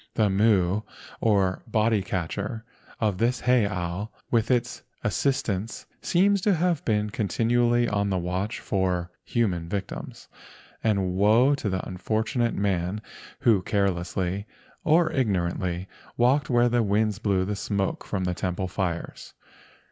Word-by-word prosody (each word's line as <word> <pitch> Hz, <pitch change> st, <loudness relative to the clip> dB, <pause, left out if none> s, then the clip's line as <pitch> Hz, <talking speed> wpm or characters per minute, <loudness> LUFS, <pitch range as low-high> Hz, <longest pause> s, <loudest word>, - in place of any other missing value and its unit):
The 105 Hz, -3 st, +3 dB
Mu, 100 Hz, -1 st, +3 dB, 0.4 s
or 100 Hz, -4 st, +2 dB
"body 110 Hz, -1 st, +2 dB
catcher," 100 Hz, +5 st, -3 dB, 0.3 s
of 105 Hz, -5 st, 0 dB
this 120 Hz, +2 st, +1 dB
heiau 100 Hz, -5 st, +1 dB, 0.2 s
with 115 Hz, -1 st, +2 dB
his 125 Hz, -1 st, 0 dB, 0.2 s
assistants 115 Hz, -7 st, -1 dB, 0.2 s
seems 200 Hz, +2 st, +3 dB
to 200 Hz, 0 st, +3 dB
have 170 Hz, -2 st, +1 dB
been 105 Hz, -2 st, +1 dB
continually 120 Hz, +4 st, +2 dB
on 100 Hz, -1 st, 0 dB
the 95 Hz, -, 0 dB
watch 90 Hz, +5 st, -2 dB
for 90 Hz, -3 st, -1 dB
human 90 Hz, -8 st, -1 dB
victims, 100 Hz, -1 st, -5 dB, 0.6 s
and 100 Hz, -4 st, +1 dB
woe 110 Hz, +8 st, +4 dB
to 130 Hz, -7 st, -2 dB
the 95 Hz, -1 st, -2 dB
unfortunate 110 Hz, +6 st, -1 dB
man 95 Hz, 0 st, -1 dB, 0.4 s
who 110 Hz, -5 st, +4 dB
carelessly 95 Hz, 0 st, -1 dB, 0.4 s
or 160 Hz, +1 st, +4 dB
igno¬ 100 Hz, -9 st, +1 dB
rantly 90 Hz, 0 st, -3 dB, 0.3 s
walked 130 Hz, +5 st, +3 dB
where 120 Hz, -1 st, +4 dB
the 120 Hz, 0 st, +2 dB
winds 105 Hz, 0 st, +1 dB
blew 100 Hz, -4 st, +1 dB
the 105 Hz, +2 st, -2 dB
smoke 100 Hz, 0 st, -2 dB
from 95 Hz, -2 st, -3 dB
the 90 Hz, 0 st, 0 dB
temple 90 Hz, +1 st, -2 dB
fires. 90 Hz, -2 st, -4 dB
105 Hz, 135 wpm, -26 LUFS, 95-120 Hz, 0.6 s, woe